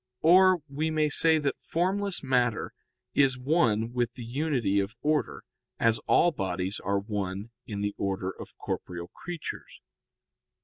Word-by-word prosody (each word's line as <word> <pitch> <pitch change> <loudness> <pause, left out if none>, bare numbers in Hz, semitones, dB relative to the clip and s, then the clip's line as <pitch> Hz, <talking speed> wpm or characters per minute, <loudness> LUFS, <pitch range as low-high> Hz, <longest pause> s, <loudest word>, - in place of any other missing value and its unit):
Or 185 0 +6
we 150 +3 -2
may 155 -1 +1
say 160 +2 +5
that 145 -2 -1
formless 190 +2 0
matter 125 -4 +1 0.4
is 135 -2 +3
one 120 -5 +1
with 120 -1 0
the 125 - -8
unity 125 -6 0
of 100 +4 -3
order, 150 0 0 0.4
as 115 -1 +3
all 175 - +5
bodies 95 - -3
are 100 +1 0
one 100 +1 -4 0.2
in 100 -2 -4
the 105 0 -1
order 95 -1 -2
of - - -11
corporeal 85 -1 -5
creatures. 175 -3 -7
125 Hz, 140 wpm, -28 LUFS, 100-155 Hz, 0.4 s, Or